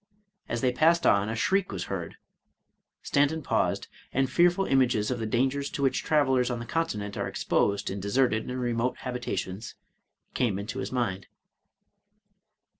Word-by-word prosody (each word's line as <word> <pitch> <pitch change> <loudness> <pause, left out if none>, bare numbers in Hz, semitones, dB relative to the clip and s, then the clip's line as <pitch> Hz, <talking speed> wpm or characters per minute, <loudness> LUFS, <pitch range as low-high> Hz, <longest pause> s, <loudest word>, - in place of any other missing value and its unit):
As 120 - -2
they 130 - +3
passed 165 +6 +3
on, 100 +1 +4
a 115 - -2
shriek 190 - +1
was 95 -3 -3
heard. - - -5 0.9
Stanton 145 +2 +1
paused, - - 0 0.2
and 135 0 +1
fearful 175 +4 +4
images 125 -5 +2
of 125 - -2
the 110 - -2
dangers 135 +5 0
to 140 - -4
which 135 - +2
travelers 130 -5 +2
on 120 - -2
the 120 - -6
Continent 105 -11 -2
are - - -1
exposed 100 0 0
in 100 - -4
deserted 110 +3 +1
and 125 0 -3
remote 120 0 -1
habita 125 -5 -3
tions, 95 +4 -5 0.6
came 110 -6 +1
into 105 +6 -5
his - - -4
mind. 105 -7 -2
125 Hz, 160 wpm, -28 LUFS, 110-135 Hz, 0.9 s, on